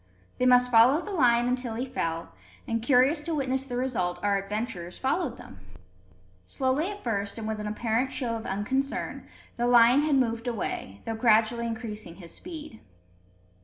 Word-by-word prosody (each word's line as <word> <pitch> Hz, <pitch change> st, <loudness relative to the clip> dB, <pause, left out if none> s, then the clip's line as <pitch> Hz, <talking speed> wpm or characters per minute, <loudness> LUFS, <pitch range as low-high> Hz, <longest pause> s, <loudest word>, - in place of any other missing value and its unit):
They 255 Hz, -, +3 dB
must 250 Hz, 0 st, +5 dB
follow 240 Hz, +6 st, +6 dB
the 410 Hz, -, -7 dB
lion 240 Hz, -8 st, +3 dB
until 250 Hz, -2 st, -2 dB
he 245 Hz, +3 st, -2 dB
fell; 165 Hz, -10 st, -3 dB, 0.3 s
and, 230 Hz, 0 st, -1 dB
curious 260 Hz, +5 st, +3 dB
to 330 Hz, +1 st, -3 dB
witness 265 Hz, -2 st, -1 dB
the 245 Hz, -2 st, -4 dB
result, 200 Hz, -9 st, -1 dB
our 200 Hz, -1 st, +2 dB
adventurers 195 Hz, -4 st, -4 dB
followed 270 Hz, -1 st, -1 dB
them. 95 Hz, -, -13 dB, 0.9 s
Slowly 270 Hz, -, 0 dB
at 415 Hz, 0 st, -8 dB
first, 200 Hz, -3 st, -2 dB
and 220 Hz, -1 st, -5 dB
with 220 Hz, -1 st, -3 dB
an 210 Hz, -, -4 dB
apparent 230 Hz, +4 st, -1 dB
show 240 Hz, -4 st, -2 dB
of 225 Hz, -, -6 dB
unconcern, 260 Hz, +8 st, -2 dB, 0.3 s
the 240 Hz, 0 st, +1 dB
lion 245 Hz, +3 st, +6 dB
had 300 Hz, -1 st, +2 dB
moved 230 Hz, -2 st, 0 dB
away, 175 Hz, -, -4 dB
though 225 Hz, -, -2 dB
gradually 225 Hz, +1 st, +3 dB
increasing 220 Hz, -6 st, -6 dB
his 170 Hz, -3 st, -10 dB
speed. 310 Hz, -8 st, -9 dB
240 Hz, 165 wpm, -27 LUFS, 215-265 Hz, 0.9 s, follow